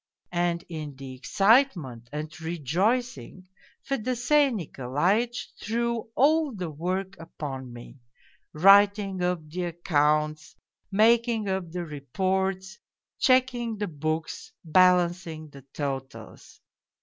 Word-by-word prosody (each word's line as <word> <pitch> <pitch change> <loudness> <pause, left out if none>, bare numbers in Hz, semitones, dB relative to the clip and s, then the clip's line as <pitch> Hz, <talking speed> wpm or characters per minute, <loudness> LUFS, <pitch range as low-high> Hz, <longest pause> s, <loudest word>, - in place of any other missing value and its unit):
And 175 -1 0
in 155 -4 -7
the 135 -1 -9
excitement 170 - +2
and 155 +2 -6
rejoicing 185 - -2 0.4
Fedosey 265 +3 +2
Nikolaitch 185 - -1
threw 235 +1 -2
all 305 +2 +3
the 180 -5 -4
work 185 +5 -3
upon 135 -6 -7
me: 120 +2 -12 0.5
writing 195 +2 +5
up 180 -3 -1
the 175 +4 -4
accounts, 155 -3 0 0.4
making 225 +1 +3
up 190 -3 -2
the 175 0 -4
reports, 190 - -2 0.4
checking 255 -4 +2
the 205 0 -2
books, 155 +1 -4
balancing 175 -2 +2
the 140 -1 -13
totals. 135 -6 -6
180 Hz, 100 wpm, -26 LUFS, 150-215 Hz, 0.5 s, writing